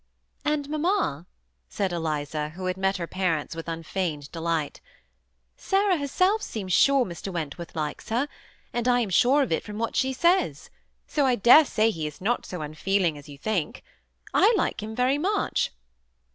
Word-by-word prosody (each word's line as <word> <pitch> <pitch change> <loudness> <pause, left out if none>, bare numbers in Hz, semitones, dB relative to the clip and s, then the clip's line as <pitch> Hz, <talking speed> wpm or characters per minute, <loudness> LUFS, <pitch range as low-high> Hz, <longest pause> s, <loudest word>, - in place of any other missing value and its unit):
^ 300 - +2
And, 290 -2 -1
mamma," 305 - 0 0.4
said 190 - -1
Eliza, 150 -2 -2
who 185 0 -6
had 185 0 -1
met 190 +1 0
her 170 - -3
par 180 -2 0
ents 150 +2 -7
with 165 0 -7
unfeigned 165 -3 -3
delight, 165 -3 -2 0.4
'' - - -48 0.3
Sarah 390 -1 +2
herself 365 +9 +1
seems 190 - -4
sure 275 +3 +5
Mr. 180 +1 -6
Wentworth 170 0 -5
likes 150 -2 -4
her, 240 +6 +1 0.5
and 240 0 -1
1 245 0 +4
am 230 -4 -1
sure 270 +9 +4
of 265 - -4
it 160 - +1
from 210 -1 -7
what 230 +1 -2
she 265 0 +2
says. 340 +8 +1 0.3
So 285 -3 +1
I 250 - +3
dare 245 +8 +7
say 225 -3 +2
he 160 -6 -3
is 150 -1 -9
not 230 +6 -1
so 180 -4 -5
un 150 0 -6
feeling 185 0 +1
as 145 0 -12
you 140 - -10
think. 180 0 -2 0.5
I 410 +4 +5
like 340 - -1
him 220 +1 -6
very 255 +4 +2
much." 400 +5 0
195 Hz, 185 wpm, -26 LUFS, 165-270 Hz, 0.5 s, dare